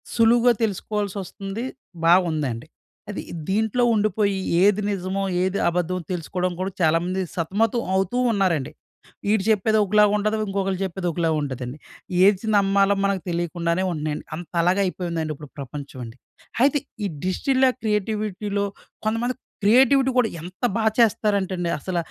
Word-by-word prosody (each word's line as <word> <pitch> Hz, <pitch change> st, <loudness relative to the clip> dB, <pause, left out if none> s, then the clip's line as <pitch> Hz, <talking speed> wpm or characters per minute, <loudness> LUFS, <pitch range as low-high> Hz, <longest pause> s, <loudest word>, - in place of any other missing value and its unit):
సులువుగా 235 Hz, +1 st, +5 dB
తెలుసుకోవాల్సి 205 Hz, -1 st, -2 dB
వస్తుంది. 195 Hz, +5 st, -6 dB, 0.4 s
బాగుందండి. 155 Hz, -8 st, +2 dB, 0.4 s
అది 205 Hz, -, -4 dB, 0.3 s
దీంట్లో 220 Hz, +4 st, +1 dB
ఉండిపోయి 205 Hz, -2 st, +1 dB, 0.3 s
ఏది 205 Hz, +1 st, +4 dB
నిజమో, 195 Hz, 0 st, -2 dB, 0.2 s
ఏది 190 Hz, +1 st, 0 dB
అబద్ధమో, 180 Hz, +1 st, -1 dB
తెలుసుకోవడం 180 Hz, +1 st, -2 dB
కూడా 190 Hz, +1 st, -2 dB
చాలా 160 Hz, 0 st, +4 dB
మంది 185 Hz, +1 st, -1 dB
సతమతం 210 Hz, +7 st, 0 dB
అవుతూ 195 Hz, +6 st, 0 dB, 0.2 s
ఉన్నారండి. 175 Hz, -9 st, +1 dB, 0.6 s
వీడు 210 Hz, -1 st, +2 dB
చెప్పేది 220 Hz, +1 st, +3 dB
ఒకలాగా 210 Hz, +1 st, +4 dB
ఉంటది. 215 Hz, +1 st, 0 dB
ఇంకొకళ్ళు 195 Hz, -1 st, -1 dB
చెప్పేది 185 Hz, 0 st, -4 dB
ఒకలాగా 165 Hz, -1 st, 0 dB
ఉంటది 135 Hz, -3 st, -4 dB
అండీ. 125 Hz, +4 st, -7 dB, 0.5 s
ఏది 200 Hz, +1 st, +3 dB
నమ్మాలో 200 Hz, 0 st, +3 dB
మనకు 200 Hz, -2 st, 0 dB
తెలియకుండానే 170 Hz, +1 st, -1 dB
ఉంటన్నయండి. 155 Hz, -2 st, -3 dB
అంతలాగా 175 Hz, +3 st, 0 dB
అయిపోయిందండి 170 Hz, -4 st, -3 dB
ఇప్పుడు 150 Hz, -1 st, -11 dB
ప్రపంచం 140 Hz, 0 st, -7 dB
అండి. 115 Hz, +2 st, -11 dB, 0.5 s
అయితే 285 Hz, +1 st, +4 dB, 0.3 s
ఈ -, -, +1 dB, 0.2 s
డిజిటిల 260 Hz, +8 st, +2 dB, 0.2 s
క్రియేటివిటీ‌లో 210 Hz, -1 st, -1 dB, 0.4 s
కొంతమంది 230 Hz, +3 st, 0 dB, 0.3 s
క్రియేటివిటీ 265 Hz, +4 st, +5 dB
కూడా 245 Hz, -3 st, +4 dB
ఎంత 180 Hz, +2 st, -11 dB, 0.2 s
బాగా 220 Hz, -1 st, +2 dB
చేస్తారంటండి 200 Hz, -5 st, +2 dB
అసల, 180 Hz, +4 st, -3 dB
195 Hz, 130 wpm, -23 LUFS, 175-215 Hz, 0.6 s, సులువుగా